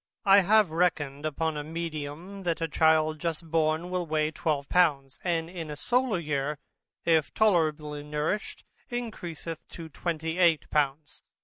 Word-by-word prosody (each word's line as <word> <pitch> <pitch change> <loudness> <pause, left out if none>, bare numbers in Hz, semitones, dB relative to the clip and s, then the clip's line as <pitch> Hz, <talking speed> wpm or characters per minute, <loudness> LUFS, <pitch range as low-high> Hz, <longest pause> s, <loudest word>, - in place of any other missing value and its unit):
I 195 0 +8
have 205 -1 +4
reckoned 155 -4 0
upon 155 +1 -2
a 150 - -3
medium, 165 +3 -5
that 170 -3 -1
a 165 - -1
child 155 0 +3
just 165 -1 -4
born 160 +2 +1
will 180 -2 -1
weigh 155 0 +1
12 150 -3 -1
pounds, 145 -7 +2
and 165 -2 0
in 170 -3 -7
a 150 - -4
solar 245 - +1
year, 150 -2 -2 0.5
if 160 -3 +3
tolerably 155 -7 +2
nursed, 150 +7 -3 0.3
encreaseth 175 -9 -5
to 165 -2 -9
28 165 +1 +1
pounds. 145 0 -1
160 Hz, 140 wpm, -28 LUFS, 150-175 Hz, 0.5 s, I